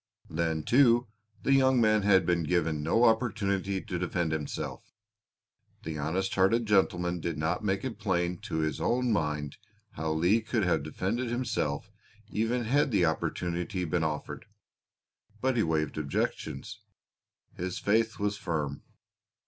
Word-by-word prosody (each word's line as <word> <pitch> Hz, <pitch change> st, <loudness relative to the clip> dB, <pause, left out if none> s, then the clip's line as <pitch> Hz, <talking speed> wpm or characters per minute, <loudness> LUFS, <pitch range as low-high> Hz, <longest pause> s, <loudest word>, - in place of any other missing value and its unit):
Then, 80 Hz, -1 st, -1 dB
too, 120 Hz, -2 st, +4 dB, 0.4 s
the 135 Hz, -, +3 dB
young 130 Hz, -1 st, +4 dB
man 110 Hz, -2 st, +4 dB
had 95 Hz, -3 st, +4 dB
been 85 Hz, 0 st, +2 dB
given 80 Hz, -2 st, 0 dB
no 85 Hz, +10 st, +2 dB
opportunity 100 Hz, -4 st, +1 dB
to 90 Hz, -, -4 dB
defend 85 Hz, -2 st, -1 dB
himself. 80 Hz, -2 st, -4 dB, 0.9 s
The 80 Hz, -1 st, -4 dB
honest 90 Hz, +6 st, -1 dB
hearted 105 Hz, +5 st, +3 dB
gentleman 90 Hz, -4 st, +2 dB
did 85 Hz, -2 st, -3 dB
not 80 Hz, +6 st, -1 dB
make 95 Hz, -1 st, 0 dB
it 125 Hz, -4 st, -5 dB
plain 90 Hz, -3 st, 0 dB
to 80 Hz, -, -3 dB
his 75 Hz, 0 st, -2 dB
own 125 Hz, -1 st, +1 dB
mind 75 Hz, -5 st, -2 dB, 0.3 s
how 80 Hz, +1 st, -2 dB
Leigh 90 Hz, +8 st, +3 dB
could 110 Hz, 0 st, -1 dB
have 90 Hz, -5 st, +2 dB
defended 95 Hz, -, -2 dB
himself 120 Hz, -, -2 dB, 0.4 s
even 115 Hz, +3 st, 0 dB
had 140 Hz, +6 st, +2 dB
the 100 Hz, -7 st, +3 dB
opportunity 90 Hz, +3 st, -2 dB
been 85 Hz, 0 st, 0 dB
offered, 75 Hz, -1 st, -4 dB, 0.9 s
but 130 Hz, +1 st, +1 dB
he 115 Hz, -, +3 dB
waived 80 Hz, -3 st, 0 dB
objections; 70 Hz, -2 st, -3 dB, 0.7 s
his 90 Hz, 0 st, -4 dB
faith 110 Hz, +2 st, +1 dB
was 105 Hz, 0 st, -1 dB
firm. 75 Hz, -7 st, -3 dB
95 Hz, 140 wpm, -29 LUFS, 80-110 Hz, 0.9 s, too